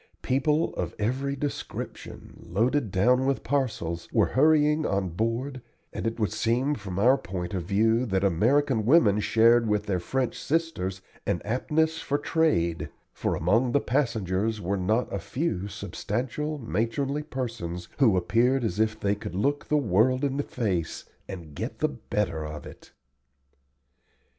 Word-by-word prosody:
People 150 +5 +1
of - - -3
every 130 +6 -1
description, 145 +1 -6 0.2
loaded 115 +7 +1
down 125 +8 +3
with 135 - 0
parcels, 110 -12 -1
were - - +3
hurrying 150 +2 +4
on 100 -7 0
board, 115 +8 -2 0.3
and - - -3
it 115 +1 -3
would 105 -5 +1
seem 125 +5 +1
from 95 -8 -6
our 125 +7 +4
point 90 0 -5
of 90 -3 -2
view 110 +5 +2
that 95 -2 0
American 115 - +2
women 110 -5 +5
shared 115 +2 +4
with 105 -1 +1
their 95 -3 0
French 130 +6 -2
sisters 125 - -1 0.2
an - - +1
aptness 155 +8 0
for 145 - -1
trade, 145 - +1 0.2
for - - -1
among 115 +9 +2
the 145 - +5
passengers 110 -6 0
were 100 +1 -1
not 110 +6 +1
a 100 - -1
few 115 - -2
substantial, 115 - -3
matronly 135 +5 -1
persons 115 - -5
who 115 -9 +5
appeared 120 +8 +2
as 105 -3 -2
if 110 0 +1
they 100 0 +1
could 100 -4 -6
look 140 +9 0
the 150 - +2
world 130 +2 +2
in 140 -1 0
the - - +1
face 100 - -2 0.2
and 85 -5 -8
get - - -5
the - - +1
better 80 +3 -2
of 75 -1 -7
it. - - -13
115 Hz, 155 wpm, -27 LUFS, 95-135 Hz, 0.3 s, women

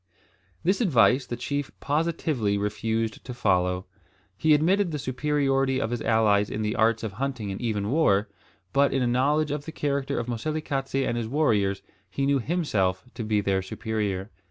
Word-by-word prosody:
This 190 +7 +2
advice 130 - +4
the 120 - -3
chief 140 +3 -3
positively 145 -8 0
refused 110 +2 -2
to 125 - -7
follow. 90 -4 +1 0.5
He 155 +9 +4
admitted 180 +5 +2
the 155 - -3
superiority 135 -1 0
of 110 -2 -2
his 120 - -2
allies 105 -2 +3
in 110 - -3
the 105 +2 -1
arts 115 0 +2
of 110 - -3
hunting 120 -2 -3
and 95 - -6
even 105 -3 -1
war, 110 -10 +3 0.5
but 140 0 +4
in 135 - +2
a - - +1
knowledge 145 +5 +2
of 145 0 -3
the 160 - -6
character 140 -2 -1
of 115 - -1
Moselekatse 135 +2 -3
and 120 - -1
his 115 -2 -2
warriors 105 -8 +1 0.3
he 135 +9 -1
knew 140 0 +3
himself 110 - 0
to 115 - -5
be 105 -1 +1
their 95 -1 +1
superior. 105 0 -3
120 Hz, 175 wpm, -26 LUFS, 105-145 Hz, 0.5 s, advice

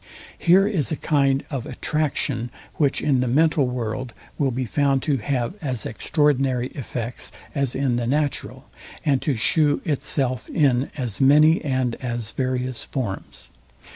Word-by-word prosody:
Here 190 +3 +5
is 160 - 0
a - - +1
kind 140 -2 +1
of 135 -4 -3
ATTRACTION, 135 -3 -1 0.3
which 145 -3 +1
in 140 -4 +3
the 125 - +1
mental 150 +1 +3
world 125 0 -3 0.3
will 140 -3 +2
be 130 +1 -2
found 135 +2 +1
to 145 -3 +1
have 125 +2 -1
as 130 -7 -2
extraordinary 135 0 +1
effects 120 -3 -4 0.2
as 140 -4 0
in 130 -3 +1
the 120 -1 -1
natural, 145 +2 -2 0.4
and 140 -4 +2
to 145 - 0
shew 145 +6 +2
itself 135 -5 -1
in 135 -4 +2
as 125 -5 -3
many 150 +4 +6
and 130 -4 0
as 120 -3 -3
various 130 -2 -2
forms. 115 -8 -5
135 Hz, 145 wpm, -23 LUFS, 125-145 Hz, 0.4 s, many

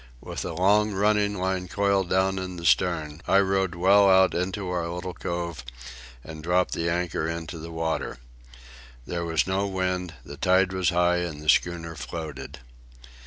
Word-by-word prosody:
With - - -6
a - - -4
long 105 +5 +3
running 105 +1 +2
line 95 -1 -2
coiled 100 -1 +1
down 95 +1 +1
in 95 -1 -5
the 85 -1 -7
stem, 80 -4 +1
I 95 - +4
rowed 95 -2 +1
well 100 +3 +5
out 95 0 +5
into 90 +2 -2
our 90 -2 -2
little 90 +1 -5
cove 85 -5 -4 0.6
and 80 -1 -9
dropped 90 +3 +1
the 85 0 -1
anchor 85 -2 -1
into 85 0 -5
the 80 +1 -8
water. 80 -4 -3 0.9
There 85 -1 -3
was 80 -1 +1
no 95 +2 0
wind, 90 -3 -2
the 70 - -9
tide 95 +4 +3
was 95 -2 +1
high, 90 0 +2
and 85 -4 -3
the 75 0 -4
schooner 85 0 +1
floated. 75 -3 -7
90 Hz, 165 wpm, -26 LUFS, 85-95 Hz, 0.9 s, well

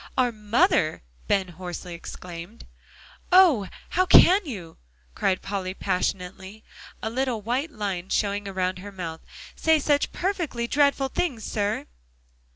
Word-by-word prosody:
"Our 250 -2 +3
mother!" 220 - +2 0.2
Ben 190 -2 +1
hoarsely 175 0 -7
exclaimed. 170 +4 -9 0.7
"Oh! 340 - +6 0.2
how 370 +1 +2
can 375 +4 +8
you?" 185 - -7 0.4
cried 185 - 0
Polly 190 -2 -3
passionately, 190 +2 -3 0.4
a 220 - -2
little 255 -1 -1
white 255 +8 -1
line 195 - -4
showing 205 -1 0
around 185 -1 -2
her 200 +2 -8
mouth, 170 -4 -6 0.3
"say 320 0 +3
such 290 -1 +1
perfectly 345 -11 -2
dreadful 280 +1 +2
things, 260 -8 -2
sir!" 205 -1 -1
205 Hz, 125 wpm, -25 LUFS, 185-270 Hz, 0.7 s, can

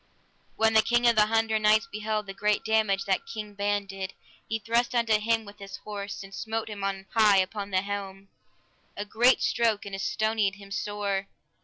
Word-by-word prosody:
When 220 0 +3
the 220 - +7
King 240 +2 +2
of 235 - +5
the 210 -1 +5
Hundred 220 0 +1
Knights 215 +3 +4
beheld 215 0 -2
the 195 - -7
great 210 +1 0
damage 215 -3 +2
that 190 -1 0
King 210 -2 -6
Ban 205 0 0
did, 195 -1 -6 0.3
he 225 - 0
thrust 235 +3 0
unto 225 -2 +3
him 225 +1 0
with 205 0 -13
his 200 0 -8
horse, 200 -1 -6
and 195 0 -12
smote 225 +2 -3
him 205 -2 -6
on 195 -1 -2
high 215 -3 +5
upon 200 +2 -1
the 190 -1 +1
helm, 195 -1 -6 0.7
a 205 - -3
great 240 +5 +3
stroke, 225 -3 +1
and 200 - -8
astonied 215 0 0
him 200 -1 -14
sore. 200 -1 -2
210 Hz, 190 wpm, -27 LUFS, 200-220 Hz, 0.7 s, the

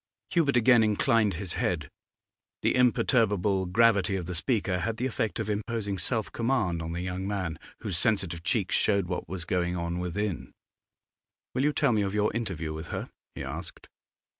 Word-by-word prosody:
Hubert 150 -7 +3
again 120 0 +6
inclined 110 -1 +2
his 90 0 -4
head. 75 -4 -1 0.8
The - - +3
imperturbable 105 -6 +3
gravity 100 -1 +3
of 90 -3 -3
the 90 - -4
speaker 95 -1 0
had 110 +6 -2
the 125 - -1
effect 110 -6 -2
of 110 - -2
imposing 105 -2 -2
self 110 +5 -1
command 115 -9 0
on 80 0 -4
the 90 - -3
young 90 +1 -3
man; 95 -6 -3 0.2
whose 100 -6 -1
sensitive 95 -7 +1
cheeks 100 +1 0
showed 100 -3 +3
what 90 -2 -4
was 90 -2 -4
going 90 0 0
on 85 0 -2
within. 90 +1 -3 1.0
'Will 130 - 0
you 150 - +4
tell 145 - +2
me 110 -2 +2
of 100 0 -1
your 105 0 +2
interview 90 -9 -2
with 80 +1 -6
her?' - - -5 0.2
he - - -5
asked. - - -7
100 Hz, 175 wpm, -28 LUFS, 90-115 Hz, 1.0 s, again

